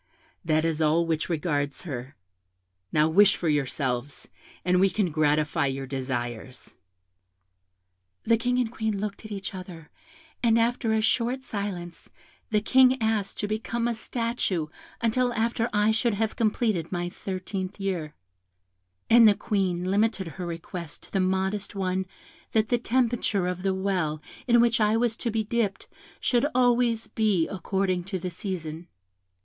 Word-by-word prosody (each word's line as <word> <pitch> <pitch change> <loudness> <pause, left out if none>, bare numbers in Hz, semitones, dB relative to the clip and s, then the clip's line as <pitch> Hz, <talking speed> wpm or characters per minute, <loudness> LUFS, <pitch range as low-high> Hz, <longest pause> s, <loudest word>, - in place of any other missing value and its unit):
That 155 -1 +2
is 165 -1 0
all 160 +2 +3
which 160 0 -1
regards 145 -4 -1
her. 130 -5 -6 0.8
Now 155 0 +4
wish 195 +5 +6
for 170 - -3
yourselves, 135 -2 -1 0.4
and 180 0 +3
we 195 +1 +5
can 185 -2 0
gratify 150 -1 +2
your 135 0 -3
desires.' 130 -2 -5 1.5
"The 230 - +4
King 245 +2 0
and 245 -3 0
Queen 220 -3 -2
looked 210 +2 -5
at 215 - -9
each 195 -1 -5
other, 180 -4 -9 0.5
and 230 -1 +4
after 230 0 +1
a 220 0 +2
short 240 +4 +1
silence, 190 -7 -5 0.4
the 210 -1 +2
King 260 +3 +5
asked 220 -3 -1
to 205 - -1
become 230 +2 -2
a 240 - 0
statue 225 -8 -2 0.3
until 245 +2 +2
after 230 +1 0
I 210 +1 +3
should 225 0 +1
have 220 +1 -1
completed 215 -6 0
my 175 -1 -2
thirteenth 185 +1 -5
year; 175 -6 -3 0.9
and 230 -1 +8
the 205 - +5
Queen 185 -5 -1
limited 200 -1 +1
her 180 +2 -6
request 170 -1 -7
to - - -15
the 195 - 0
modest 190 +2 -1
one 190 -1 -1 0.5
that 220 -1 +2
the 245 - +2
temperature 235 -5 +1
of 180 0 -2
the 190 0 0
well 185 -6 -1 0.3
in 240 -1 +5
which 235 -1 +3
I 215 +1 +3
was 235 -1 +1
to 240 - -2
be 220 0 0
dipped 215 -2 -1 0.3
should 240 -2 +2
be 290 - +1
always 245 -2 +3 0.4
according 190 -1 -1
to 190 0 -3
the 180 0 -4
season. 170 -3 -5
195 Hz, 155 wpm, -26 LUFS, 170-225 Hz, 1.5 s, and